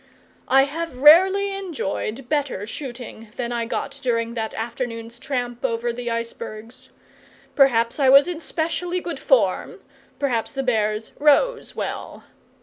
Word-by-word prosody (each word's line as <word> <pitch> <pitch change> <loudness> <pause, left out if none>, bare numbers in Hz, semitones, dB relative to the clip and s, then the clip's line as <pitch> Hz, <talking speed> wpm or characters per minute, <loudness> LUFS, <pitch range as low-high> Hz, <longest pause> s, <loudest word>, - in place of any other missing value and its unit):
I 270 +1 +6
have 305 0 -4
rarely 380 +8 +6
enjoyed 270 - -4
better 285 -9 -1
shooting 240 -2 -7
than 240 -1 -3
I 235 -1 -2
got 275 - -4
during 230 -3 0
that 225 -2 -4
afternoon's 230 0 -5
tramp 245 -3 -4
over 235 -1 -1
the 240 0 -4
icebergs. 230 +1 -6 0.7
Perhaps 235 -3 +3
I 270 -2 +4
was 275 +3 +7
in 350 -3 -4
specially 345 +2 -2
good 345 -1 -5
form; - - +1 0.4
perhaps 245 -6 -1
the 270 -1 -2
bears 215 -3 0
"rose" 305 - +3
well. - - -5
255 Hz, 135 wpm, -23 LUFS, 230-295 Hz, 0.7 s, was